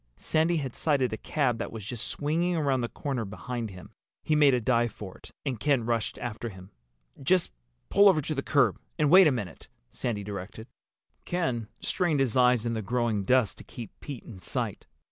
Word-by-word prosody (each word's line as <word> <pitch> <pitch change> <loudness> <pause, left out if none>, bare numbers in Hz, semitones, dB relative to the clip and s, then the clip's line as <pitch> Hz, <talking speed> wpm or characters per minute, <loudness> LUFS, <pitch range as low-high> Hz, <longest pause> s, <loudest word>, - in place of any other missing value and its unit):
Sandy 160 - +1
had 135 -5 -4
sighted 135 -7 +1
a - - -2
cab 125 -5 0
that - - -4
was 110 -3 -7
just 115 +1 -3
swinging 170 +5 0
around 140 -5 +1
the 120 - -2
corner 135 -5 -3
behind 115 +3 -5
him. 90 -4 -11 0.3
He 155 - +2
made 145 -3 +6
a - - +1
dive 120 0 +2
for 100 -2 -9
it - - -12 0.2
and 130 -6 -2
Ken 135 -3 +2
rushed 115 -2 -1
after 120 0 -4
him. 95 -1 -12 0.5
"Just 180 +6 +2 0.4
pull 200 +1 +7
over 175 -5 +4
to 155 +1 -2
the 135 - -1
curb 135 -8 +2 0.2
and 150 -1 +2
wait 185 -1 +9
a - - +4
minute," 105 - -5 0.2
Sandy 110 -4 -3
directed. 100 +2 -7 0.6
Ken 130 -11 -1
strained 170 -5 +1
his 130 -5 +1
eyes 125 -2 +4
in 115 - 0
the 110 - -2
growing 115 -2 0
dusk 125 -1 +3
to - - -11
keep 115 -5 -9
Pete 140 -5 -7
in 100 -5 -11
sight. 90 - -3
125 Hz, 200 wpm, -28 LUFS, 110-145 Hz, 0.6 s, wait